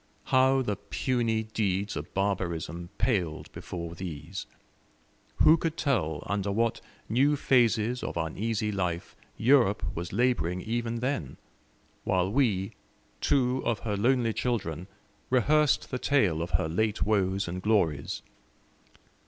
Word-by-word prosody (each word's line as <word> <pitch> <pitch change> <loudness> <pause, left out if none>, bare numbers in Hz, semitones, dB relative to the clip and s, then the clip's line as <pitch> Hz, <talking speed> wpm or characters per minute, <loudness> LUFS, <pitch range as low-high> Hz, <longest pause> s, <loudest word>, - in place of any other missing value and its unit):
How 130 +1 +5
the 105 -4 -2
puny 115 -4 -1
deeds 105 -2 -1
of 75 - -6
barbarism 85 -4 -2
paled 90 -10 -1
before 85 -2 -6
these! 85 +1 -6 1.0
Who 160 - +7
could 165 0 -2
tell 90 - 0
under 100 +1 -1
what 115 +2 0 0.3
new 135 +6 +3
phases 120 -3 +2
of - - -4
uneasy 105 +6 -1
life 90 -4 -3 0.2
Europe 115 -4 +4
was 85 +1 -5
labouring 105 -6 +1
even 115 +2 -2
then, 125 - -2 0.7
while 95 0 +1
we, 105 -7 +1 0.5
two 130 -1 +2
of 115 -2 -1
her 105 -3 -2
lonely 120 +2 +2
children, 95 -10 -2 0.4
rehearsed 145 +4 +3
the 125 - -2
tale 100 - +2
of 85 - -3
her 80 - -1
late 105 +6 0
woes 100 -2 +1
and 90 +2 -4
glories? 90 -9 0
105 Hz, 125 wpm, -28 LUFS, 90-125 Hz, 1.0 s, Who